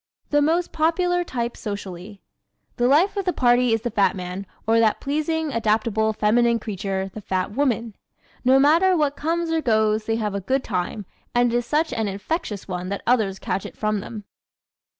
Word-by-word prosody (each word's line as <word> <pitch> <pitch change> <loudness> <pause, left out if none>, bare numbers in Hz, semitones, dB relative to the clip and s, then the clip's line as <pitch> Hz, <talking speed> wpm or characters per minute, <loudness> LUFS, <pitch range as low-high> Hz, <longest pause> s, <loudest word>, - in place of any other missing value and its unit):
The 290 0 +4
Most 330 +4 +1
Popular 355 +3 +1
Type 240 -7 -3
Socially 200 -1 -7 0.5
¶ - - -45
"The 245 - +2
life 330 +10 +4
of 400 - 0
the 365 - +2
party" 245 -4 +3
is 225 -1 +1
the 240 0 -3
fat 200 -1 +2
man 185 +1 -6 0.2
or 225 +1 +3
that 220 -2 +3
pleasing, 310 +1 -1
adaptable, 220 -1 +1
feminine 230 +2 +2
creature, 195 -3 -4
the 215 - -7
fat 185 0 -2
woman. 235 -3 -1 0.5
No 260 +1 +5
matter 335 +7 +4
what 290 -2 +1
comes 330 +2 -1
or 325 -1 +1
goes 220 -3 +2
they 225 - 0
have 215 -3 -2
a 200 - -2
good 260 +7 0
time 195 +1 -3 0.3
and 240 -1 +3
it - - +3
is 240 0 -3
such 305 -1 +1
an 225 -3 -1
infectious 205 - -4
one 180 -1 -4
that 200 - -4
others 220 -6 +2
catch 195 - -3
it - - -9
from 215 -1 0
them. 210 +1 -8
230 Hz, 190 wpm, -23 LUFS, 205-290 Hz, 0.5 s, No